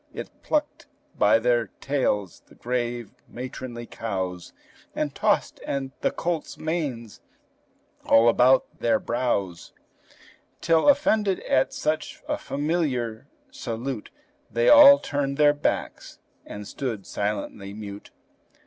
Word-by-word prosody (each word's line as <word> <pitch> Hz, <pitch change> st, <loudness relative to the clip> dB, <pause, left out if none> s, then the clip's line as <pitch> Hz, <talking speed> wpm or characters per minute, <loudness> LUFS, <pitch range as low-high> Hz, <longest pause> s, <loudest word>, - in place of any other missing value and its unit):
It -, -, -6 dB
plucked 295 Hz, -1 st, -2 dB, 0.3 s
by 105 Hz, +2 st, +4 dB
their 120 Hz, -1 st, +1 dB
tails 105 Hz, -9 st, -1 dB
the -, -, -19 dB
grave, 120 Hz, -2 st, -3 dB, 0.2 s
matronly 125 Hz, -1 st, -7 dB
cows, 95 Hz, -6 st, -4 dB, 0.4 s
And -, -, -2 dB
tossed -, -, 0 dB
the 135 Hz, -1 st, -2 dB
colts' 170 Hz, -2 st, -3 dB
manes 145 Hz, -9 st, -4 dB, 0.9 s
all 115 Hz, +1 st, +6 dB
about 125 Hz, +3 st, +3 dB
their 115 Hz, -2 st, +2 dB
brows, 100 Hz, -9 st, -2 dB, 0.9 s
Till, 165 Hz, -, +3 dB
offended 220 Hz, -9 st, +3 dB
at 130 Hz, -, +1 dB
such 155 Hz, +1 st, -3 dB
a -, -, -2 dB
familiar 140 Hz, -7 st, -2 dB, 0.2 s
salute, 120 Hz, -, -5 dB, 0.4 s
They 120 Hz, 0 st, +2 dB
all 285 Hz, -1 st, +10 dB
turned 140 Hz, -, -2 dB
their 150 Hz, -1 st, +5 dB
backs 145 Hz, -, -3 dB, 0.3 s
and 105 Hz, -1 st, -8 dB
stood 115 Hz, -8 st, -4 dB
silently 100 Hz, -1 st, -4 dB
mute. 100 Hz, -1 st, -9 dB
125 Hz, 110 wpm, -25 LUFS, 110-150 Hz, 0.9 s, all